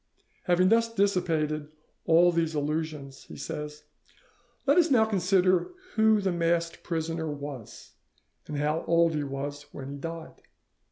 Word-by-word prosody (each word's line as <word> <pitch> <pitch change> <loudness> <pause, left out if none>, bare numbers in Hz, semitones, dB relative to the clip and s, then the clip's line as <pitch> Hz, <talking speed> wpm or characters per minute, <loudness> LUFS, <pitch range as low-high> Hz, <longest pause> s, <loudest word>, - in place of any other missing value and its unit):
"Having 180 0 +4
thus 230 +1 +3
dissipated 165 -8 0 0.4
all 170 +2 +6
these 165 -2 0
illusions," 150 -2 -3
he - - -11
says, 150 +1 -6 0.8
"let 285 +5 +5
us 340 - +3
now 235 -5 +5
consider 185 - +2 0.2
who 220 -1 +4
the 195 -2 0
masked 170 -1 0
prisoner 165 -1 -3
was, 140 -5 -8 0.6
and 150 - -4
how 150 +2 0
old 170 0 +4
he 150 -1 -1
was 145 +1 -5
when 135 -1 -8
he - - -6
died. 165 +2 -7
165 Hz, 135 wpm, -28 LUFS, 150-185 Hz, 0.8 s, all